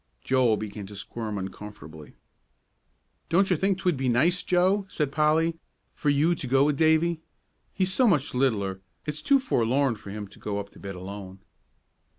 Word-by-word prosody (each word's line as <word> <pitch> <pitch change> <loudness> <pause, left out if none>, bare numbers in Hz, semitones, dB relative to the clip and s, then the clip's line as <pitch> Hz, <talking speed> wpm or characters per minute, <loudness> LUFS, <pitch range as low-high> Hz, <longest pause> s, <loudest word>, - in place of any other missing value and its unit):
Joel 125 -4 +3
began 105 -2 -6
to 105 - -10
squirm 105 +2 -5
uncomfortably. 95 -6 -9 1.1
"Don't 190 +3 +3
you - - +5
think 190 +3 +1
'twould 180 -6 0
be 130 -1 0
nice, 165 +10 +3
Joe," 190 +3 +2
said 150 -3 -1
Polly, 160 +2 +2 0.3
"for 150 - -1
you 150 +4 +3
to 160 -6 -5
go 135 +2 +4
with 150 0 +2
Davie? 160 +2 +3 0.5
He's 190 -1 0
so 255 +3 +4
much 150 -9 +2
littler; 100 -7 0 0.2
it's 150 0 -4
too 280 - +4
forlorn 135 - +1
for 100 - -11
him 105 0 -6
to - - -16
go 100 -1 -3
up 100 0 -6
to - - -16
bed 100 -1 -7
alone." 95 +1 -8
135 Hz, 170 wpm, -26 LUFS, 105-165 Hz, 1.1 s, you